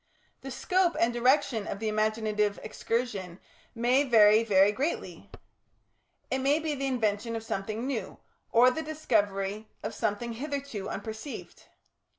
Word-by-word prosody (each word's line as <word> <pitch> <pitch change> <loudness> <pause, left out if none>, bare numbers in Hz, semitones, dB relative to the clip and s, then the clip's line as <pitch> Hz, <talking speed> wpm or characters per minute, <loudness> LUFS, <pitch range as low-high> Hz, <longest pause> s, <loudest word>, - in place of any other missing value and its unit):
The 270 - -7
scope 360 +6 +1
and 235 +1 +2
direction 240 -3 +2
of - - -4
the 220 +2 -3
imaginative 215 -1 0
excursion 210 -6 -3 0.4
may 245 +4 +3
vary 220 -4 +6
very 200 -2 +4
greatly. 275 +10 -4 1.0
It 265 - +1
may 275 +3 +3
be 315 -1 -2
the 275 -1 -2
invention 230 -2 -1
of 225 - -4
something 215 +2 -3
new 245 -8 -4 0.3
or 245 +2 +6
the 320 - -3
discovery 215 -9 -1 0.2
of - - -4
something 225 +2 -2
hitherto 275 -5 -5
unperceived. 220 +5 -7
230 Hz, 135 wpm, -29 LUFS, 210-265 Hz, 1.0 s, vary